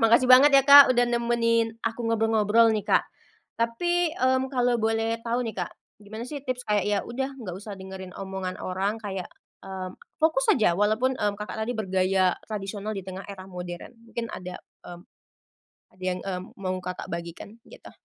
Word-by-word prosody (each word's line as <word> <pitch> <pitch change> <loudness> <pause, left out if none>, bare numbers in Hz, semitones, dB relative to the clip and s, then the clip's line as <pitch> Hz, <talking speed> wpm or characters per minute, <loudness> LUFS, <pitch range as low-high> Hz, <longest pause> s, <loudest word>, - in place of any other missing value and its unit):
Makasih 235 +2 +5
banget 260 +3 +9
ya, 275 - +6
Kak, 285 -1 +10
udah 245 0 +3
nemenin 230 -1 +1
aku 230 +1 -2
ngobrol-ngobrol 225 0 +3
nih, 210 - -1
Kak. - - +3 0.5
Tapi, 345 +10 +1
mmm, 260 +1 +2
kalo 245 -2 +2
boleh 225 +1 0
tau 235 +1 -1
nih, 225 - -3
Kak, - - -2 0.3
gimana 220 +3 -7
sih 285 +2 -6
tips 255 -2 -4
kayak 210 -1 +2
ya 205 -1 +2
udah 265 +3 -3
nggak 195 -8 -6
usah 205 +1 -8
dengerin 190 -1 -9
omongan 190 -1 -5
orang 195 +3 -1
kayak, 195 -3 -5 0.4
mmm, 190 -1 -6 0.3
fokus 315 -4 +2
aja 215 -8 +3
walaupun, 220 +5 +2
mmm, 205 -1 0
Kakak 210 +1 -6
tadi 245 - -1
bergaya 190 -2 +2 0.2
tradisional 205 0 -4
di 195 - -4
tengah 190 +1 -7
era 190 -2 -8
modern. 180 +3 -8 0.2
Mungkin 230 0 -5
ada, 180 0 -7 0.3
mmm, 175 0 -9 0.9
ada 185 - -20
yang, 185 0 -1
mmm, 185 -2 -4
mau 185 -1 -2
Kakak 180 0 -6
bagikan 170 +5 -7
gitu? - - -13
215 Hz, 175 wpm, -26 LUFS, 190-235 Hz, 0.9 s, Kak